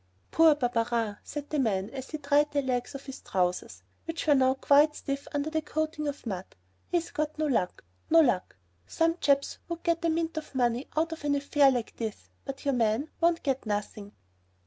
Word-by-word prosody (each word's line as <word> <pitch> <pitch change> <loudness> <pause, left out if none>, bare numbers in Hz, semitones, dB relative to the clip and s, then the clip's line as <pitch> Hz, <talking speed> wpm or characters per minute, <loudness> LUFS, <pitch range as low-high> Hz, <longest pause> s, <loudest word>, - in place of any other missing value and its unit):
"Poor 325 -2 +6
Barberin," 230 -5 0
said 295 -1 -7
the 305 - 0
man 205 -4 0
as 265 -1 -7
he 310 - -4
dried 290 0 +2
the 285 -1 0
legs 250 +1 -2
of 275 - -8
his 270 -1 -8
trousers, 180 -1 -2 0.2
which 330 0 -4
were 300 - +5
now 260 -1 +4
quite 290 +2 +4
stiff 275 0 -4
under 290 +2 -2
the 315 0 0
coating 310 0 -2
of 285 -2 -5
mud, 190 -4 -5 0.3
"he's 340 -1 -1
got 305 0 -2
no 310 - 0
luck, 230 -11 0 0.3
no 330 - +7
luck! 240 - +2 0.3
Some 330 +1 +1
chaps 280 -1 +2
would 340 -1 -5
get 335 -1 +1
a 335 - +2
mint 325 0 -1
o' 305 -3 -14
money 245 0 +1
out 325 +1 +1
of 325 -2 -7
an 290 -1 +2
affair 280 0 +4
like 245 -4 -2
this, 220 -2 -5
but 275 0 -7
your 280 - +2
man 235 +4 +1
won't 335 0 +3
get 270 -5 -1
nothing!" 205 0 -4
280 Hz, 200 wpm, -28 LUFS, 240-310 Hz, 0.3 s, no